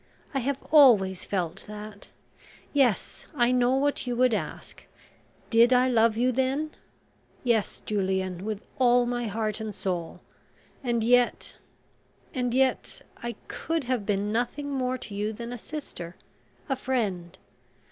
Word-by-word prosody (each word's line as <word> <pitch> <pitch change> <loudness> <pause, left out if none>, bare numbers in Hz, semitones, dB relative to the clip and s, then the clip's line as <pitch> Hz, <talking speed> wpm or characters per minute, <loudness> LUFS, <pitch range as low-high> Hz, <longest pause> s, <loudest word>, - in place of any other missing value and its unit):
I 270 - +1
have 270 +2 -1
always 215 - +6
felt 180 -2 -3
that... 210 -1 -9 0.7
yes, 260 -8 +1
I 240 0 +3
know 250 0 +3
what 280 -1 0
you 245 - -1
would 250 0 +3
ask. - - -5 0.7
Did 235 +1 +6
I 250 0 +5
love 225 -2 +3
you 250 +2 +3
then? 265 +5 0 0.7
Yes, 230 -5 +1
Julian, 190 -3 -1
with 215 -1 -4 0.2
all 245 -1 +5
my 240 -1 -2
heart 215 0 -2
and 215 -2 -5
soul... 175 -3 -3 0.6
and 235 -3 0
yet 245 +1 +2 0.7
and 250 -2 -1
yet 260 +1 +1 0.2
I 235 -1 -4
could 325 -2 -2
have 250 -3 -1
been 205 0 0
nothing 245 +5 -1
more 255 -1 -1
to 225 - -8
you 210 +2 -2
than 235 +2 -6
a - - -5
sister, 210 - -7 0.5
a 270 - 0
friend. 195 -9 -2
240 Hz, 140 wpm, -27 LUFS, 210-255 Hz, 0.7 s, always